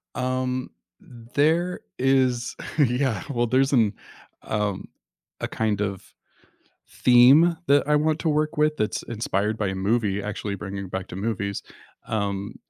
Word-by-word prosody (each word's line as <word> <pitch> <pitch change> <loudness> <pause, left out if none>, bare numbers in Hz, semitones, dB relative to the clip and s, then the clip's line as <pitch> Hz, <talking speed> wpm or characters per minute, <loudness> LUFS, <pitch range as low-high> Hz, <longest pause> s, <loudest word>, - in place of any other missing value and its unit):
Um, 130 0 -2 0.3
there 155 - -1 0.2
is 130 -2 +1 0.2
Yeah, 125 -5 +1
well, 120 -3 0
there's 135 +3 +2
an, 110 -4 +3 0.5
um 105 -3 -2 0.5
a - - -1
kind 110 -2 -1
of 100 -2 -4 0.8
theme 135 +8 +6
that 140 +1 +4
I 150 - +3
want 155 +1 +1
to 165 - 0
work 150 0 0
with 150 0 +2
that's 105 - -1
inspired 105 -1 -2
by 105 - -1
a 95 - -2
movie 100 0 0
actually 105 -1 -4
bringing 100 0 -6
back 95 0 -4
to - - -7
movies, 100 -1 -3 0.5
um, 100 -2 -2
120 Hz, 135 wpm, -24 LUFS, 100-140 Hz, 0.8 s, theme